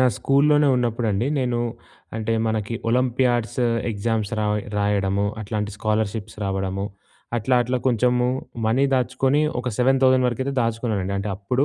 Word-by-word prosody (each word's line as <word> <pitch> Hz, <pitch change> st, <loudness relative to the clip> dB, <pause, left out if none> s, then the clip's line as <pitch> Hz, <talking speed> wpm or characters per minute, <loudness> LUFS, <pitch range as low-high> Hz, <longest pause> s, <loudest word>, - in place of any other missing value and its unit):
నా 130 Hz, -, +5 dB
స్కూల్‌లోనే 145 Hz, +1 st, +3 dB
ఉన్నప్పుడండి 115 Hz, -2 st, 0 dB
నేను 125 Hz, -2 st, 0 dB, 0.6 s
అంటే 110 Hz, +1 st, -1 dB
మనకి 110 Hz, 0 st, -1 dB, 0.2 s
ఒలంపియాడ్స్ 125 Hz, -1 st, +1 dB, 0.3 s
ఎగ్జామ్స్ 110 Hz, -1 st, -2 dB
రాయ్ 105 Hz, 0 st, 0 dB, 0.2 s
రాయడము, 100 Hz, -1 st, +1 dB
అట్లాంటి 105 Hz, 0 st, -3 dB
స్కాలర్షిప్స్ 110 Hz, 0 st, -2 dB
రావడము. 95 Hz, 0 st, -2 dB, 0.5 s
అట్లా 125 Hz, +3 st, +1 dB
అట్లా 125 Hz, +1 st, -1 dB
కొంచెము 125 Hz, +1 st, +2 dB, 0.4 s
మనీ 125 Hz, +5 st, +3 dB
దాచుకొని 130 Hz, +3 st, +1 dB, 0.2 s
ఒక 125 Hz, -, -3 dB
7000 130 Hz, 0 st, +4 dB
వరకైతే 130 Hz, +3 st, -2 dB
దాచుకున్నానండి 110 Hz, -4 st, -1 dB
అంటే 100 Hz, -, -3 dB
అప్పుడు 125 Hz, +7 st, 0 dB
115 Hz, 125 wpm, -23 LUFS, 105-125 Hz, 0.6 s, నా